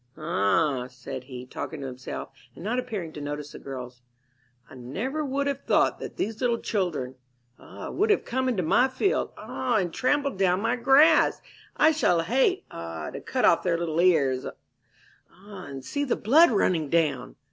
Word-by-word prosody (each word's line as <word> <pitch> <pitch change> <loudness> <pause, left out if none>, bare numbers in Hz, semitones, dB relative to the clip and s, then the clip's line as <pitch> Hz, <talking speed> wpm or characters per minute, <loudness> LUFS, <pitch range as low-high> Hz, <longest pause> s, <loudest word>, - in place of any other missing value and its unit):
"Ah," 145 -2 +1
said 130 0 -8
he, 125 -2 -8
talking 145 +3 -6
to - - -5
himself, 130 -1 -7 0.2
and - - -10
not 235 +5 -1
appearing 210 -10 -5
to 150 - -7
notice 145 0 -5
the - - -10
girls, 125 -2 -8 0.7
"I - - -15
never 200 - -4
would 280 0 -1
have 280 -1 -2
thought - - +2
that - - -8
these 220 +3 -3
little 240 -2 +2
children 170 - -2 0.4
ah, - - -9
would 425 +2 +1
have 420 - +2
come 260 +1 -1
into 205 -8 0
my 245 +11 +4
field 390 +9 0
ah, 255 -2 -2
and 180 -5 -1
trampled 280 -4 0
down 185 -1 +3
my 230 +4 0
grass! 280 +6 +5 0.4
I 315 - +6
shall 180 - +2
hate 265 - +1
ah, 85 -1 -6
to - - -7
cut - - 0
off - - +5
their 170 -2 0
little 165 -1 -2
ears 140 -8 +3
ah, 195 -1 -15
and 135 -2 -8
see 285 - -2
the 270 - 0
blood 310 +10 +5
running 175 - +1
down!" 155 - 0
180 Hz, 180 wpm, -26 LUFS, -, 0.7 s, I